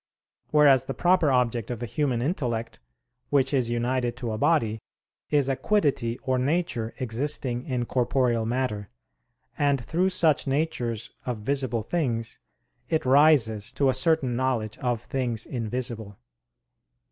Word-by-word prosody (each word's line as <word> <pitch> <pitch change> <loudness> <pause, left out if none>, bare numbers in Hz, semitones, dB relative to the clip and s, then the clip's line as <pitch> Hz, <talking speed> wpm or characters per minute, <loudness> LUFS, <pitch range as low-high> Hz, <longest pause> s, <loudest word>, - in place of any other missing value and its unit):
Whereas 140 -4 +5
the 135 - -4
proper 175 -3 +3
object 120 -3 +1
of 120 -3 -4
the 120 - -3
human 125 0 -1
intellect, 120 - -2 0.5
which 140 0 +2
is 125 -4 +2
united 120 0 -1
to 120 -3 -4
a 110 - -3
body, 115 -10 +1 0.5
is 145 -3 +2
a 135 - +1
quiddity 130 - 0
or 130 -1 0
nature 130 -5 -1
existing 125 +1 -2
in 125 -3 -1
corporeal 125 -2 +1
matter; 115 -5 -2 0.7
and 140 -2 +2
through 165 - 0
such 155 -6 +2
natures 125 -6 -2 0.2
of 125 -2 -1
visible 130 -2 -1
things 115 -6 -2 0.5
it 160 -4 0
rises 130 -6 +4
to 135 0 +2
a - - +3
certain 130 -1 +1
knowledge 120 -4 -1
of 120 -2 -1
things 120 -4 -2
invisible. 115 -3 -4
125 Hz, 135 wpm, -26 LUFS, 115-140 Hz, 0.7 s, Whereas